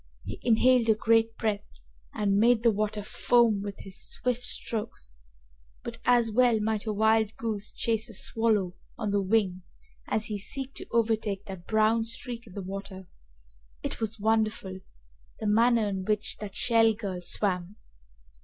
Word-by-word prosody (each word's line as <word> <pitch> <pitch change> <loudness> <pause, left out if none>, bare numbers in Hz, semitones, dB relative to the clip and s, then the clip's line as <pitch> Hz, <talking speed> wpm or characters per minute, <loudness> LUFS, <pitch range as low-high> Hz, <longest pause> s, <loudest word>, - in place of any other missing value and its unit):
He - - -6
inhaled 245 0 +4
a 220 - +6
great 225 +1 +2
breath 210 -3 -1 0.5
and 200 -1 +1
made 235 +1 +4
the 230 - +5
water 210 0 -2
foam 230 -1 +2
with 200 -1 -6
his 190 -1 -7
swift 250 -1 -1
strokes, 225 - -4 0.7
but 230 -1 -7
as 240 -2 +4
well 240 0 +4
might 215 0 -1
a - - +1
wild 220 +1 +2
goose 215 -3 -3
chase 225 0 -1
a 225 - -7
swallow 215 -4 0 0.2
on 210 -3 -2
the 200 0 +2
wing 190 -2 +1 0.5
as 215 0 0
he 210 -2 -1
seek 270 +6 -2
to - - -6
overtake 220 -3 0
that 190 -3 -9
brown 220 +1 +3
streak 235 +1 -5
on 190 - -13
the 200 - -6
water. 190 0 -7 0.8
It - - -4
was 220 0 -3
wonderful, 215 -3 0 0.6
the - - -6
manner 225 +1 +3
in 190 -1 -3
which 215 +1 -1
that 205 -2 -8
Shell 225 -2 +3
girl 195 -5 -5
swam! 180 +1 0
220 Hz, 160 wpm, -28 LUFS, 200-230 Hz, 0.8 s, a